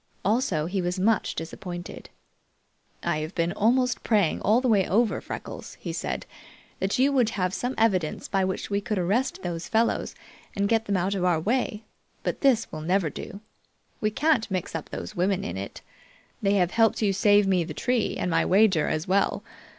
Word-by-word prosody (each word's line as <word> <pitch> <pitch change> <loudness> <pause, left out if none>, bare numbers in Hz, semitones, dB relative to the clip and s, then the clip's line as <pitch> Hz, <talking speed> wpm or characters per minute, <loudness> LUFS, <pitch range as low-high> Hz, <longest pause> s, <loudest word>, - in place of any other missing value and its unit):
Also, 200 - +1
he 185 +3 -1
was 180 +1 -2
much 215 +3 +1
disappointed. 175 +2 -7 0.9
"I 170 -3 0
have 155 +3 -5
been 170 0 +1
almost 245 +5 +2
praying 205 -8 +2
all 215 +4 +4
the 255 - 0
way 205 -5 +3
over, 220 +2 +2
Freckles," - - -7
he - - -5
said, - - -3 0.5
"that 195 +5 0
you 270 +3 +4
would 250 -5 +3
have 185 -1 0
some 245 +5 -2
evidence 190 -8 +1
by 195 -1 +1
which 190 +2 -3
we 200 0 +1
could 210 0 -2
arrest 205 +9 0
those 170 -2 -4
fellows 225 +1 0 0.4
and 200 0 +1
get 225 +1 +1
them 200 -2 0
out 185 +3 0
of 190 -3 -2
our 175 -3 +3
way, 220 +2 -1 0.4
but - - -2
this 250 -5 +3
will 155 - -6
never 175 -1 +1
do. 200 - -8 0.6
We 215 - +1
can't 265 0 +1
mix 185 -2 -3
up 160 - -5
those 215 - -6
women 185 +1 +1
in 90 - -4
it. 100 +1 -6 0.6
They 200 0 +2
have 180 -2 +2
helped 225 -1 +2
you 200 -2 +2
save 205 +1 +4
me 185 -3 +2
the - - -7
tree 245 -3 0
and 180 - -1
my - - +3
wager 190 -5 +4
as 155 +1 -2
well. 195 +2 +1
195 Hz, 190 wpm, -26 LUFS, 180-225 Hz, 0.9 s, all